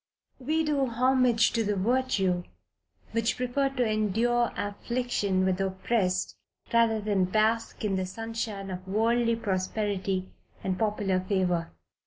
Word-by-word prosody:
We 310 Hz, +5 st, 0 dB
do 290 Hz, -3 st, +1 dB
homage 250 Hz, -1 st, +3 dB
to 230 Hz, -, +1 dB
the 205 Hz, -1 st, 0 dB
virtue 195 Hz, -4 st, +1 dB, 0.7 s
which 230 Hz, 0 st, 0 dB
preferred 270 Hz, +2 st, -1 dB
to 250 Hz, -, +3 dB
endure 225 Hz, +3 st, +1 dB
affliction 205 Hz, -2 st, -1 dB
with 185 Hz, -1 st, +1 dB
the 195 Hz, 0 st, 0 dB
oppressed, 190 Hz, 0 st, -1 dB, 0.4 s
rather 230 Hz, -1 st, +4 dB
than 205 Hz, -3 st, +1 dB
to -, -, -13 dB
bask 220 Hz, +1 st, +1 dB
in 195 Hz, -2 st, 0 dB
the 185 Hz, 0 st, -2 dB
sunshine 220 Hz, -1 st, -4 dB
of 185 Hz, +1 st, -7 dB
worldly 230 Hz, +3 st, +2 dB
prosperity 190 Hz, -2 st, -2 dB, 0.3 s
and 185 Hz, -1 st, -1 dB
popular 205 Hz, -3 st, +1 dB
favor. 185 Hz, -3 st, 0 dB
215 Hz, 135 wpm, -28 LUFS, 190-235 Hz, 0.7 s, rather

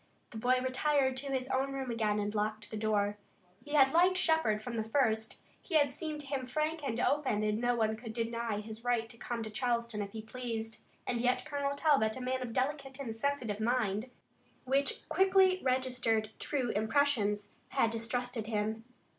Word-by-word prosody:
The 220 Hz, -, -6 dB
boy 250 Hz, +3 st, +3 dB
retired 265 Hz, 0 st, +2 dB
to 280 Hz, +2 st, -4 dB
his 260 Hz, -1 st, -1 dB
own 270 Hz, +1 st, 0 dB
room 265 Hz, -2 st, -3 dB
again 215 Hz, -3 st, +1 dB
and 205 Hz, 0 st, -1 dB
locked 215 Hz, 0 st, -2 dB
the -, -, -4 dB
door. 210 Hz, -1 st, 0 dB, 0.4 s
He 295 Hz, -, -8 dB
had 270 Hz, -1 st, +6 dB
liked 360 Hz, +2 st, +5 dB
Shepard 320 Hz, -, +3 dB
from 235 Hz, +2 st, -6 dB
the 220 Hz, -, 0 dB
first. 220 Hz, -2 st, +1 dB, 0.2 s
He 345 Hz, -, -4 dB
had 285 Hz, -3 st, +4 dB
seemed 305 Hz, 0 st, -4 dB
to -, -, -10 dB
him 270 Hz, -2 st, -3 dB
frank 310 Hz, +3 st, -1 dB
and 240 Hz, -4 st, -2 dB
open 260 Hz, -7 st, +1 dB
and 215 Hz, +1 st, 0 dB
no 245 Hz, 0 st, +2 dB
one 220 Hz, -1 st, +1 dB
could 220 Hz, 0 st, -7 dB
deny 230 Hz, -2 st, -2 dB
his 220 Hz, +1 st, -9 dB
right 240 Hz, -2 st, +1 dB
to 230 Hz, -, -11 dB
come 235 Hz, -2 st, -3 dB
to 220 Hz, -, -6 dB
Charleston 235 Hz, -2 st, -1 dB
if 200 Hz, -1 st, -5 dB
he 220 Hz, -1 st, -6 dB
pleased. 225 Hz, -2 st, -5 dB, 0.3 s
And 240 Hz, -2 st, -1 dB
yet 250 Hz, +1 st, +1 dB
Colonel 285 Hz, -2 st, -1 dB
Talbot, 275 Hz, -7 st, +3 dB
a -, -, -6 dB
man 255 Hz, +1 st, -1 dB
of 250 Hz, -, -2 dB
a -, -, -7 dB
delicate 270 Hz, +2 st, -2 dB
and 235 Hz, -5 st, -4 dB
sensitive 230 Hz, -4 st, -1 dB
mind, 225 Hz, -1 st, 0 dB, 0.5 s
which 275 Hz, +2 st, 0 dB
quickly 380 Hz, -1 st, +4 dB
registered 250 Hz, -4 st, 0 dB
true 265 Hz, -5 st, -1 dB
impressions, 215 Hz, -3 st, +1 dB, 0.2 s
had 225 Hz, -, +2 dB
distrusted 230 Hz, 0 st, -2 dB
him. 220 Hz, 0 st, -1 dB
245 Hz, 190 wpm, -32 LUFS, 220-275 Hz, 0.5 s, had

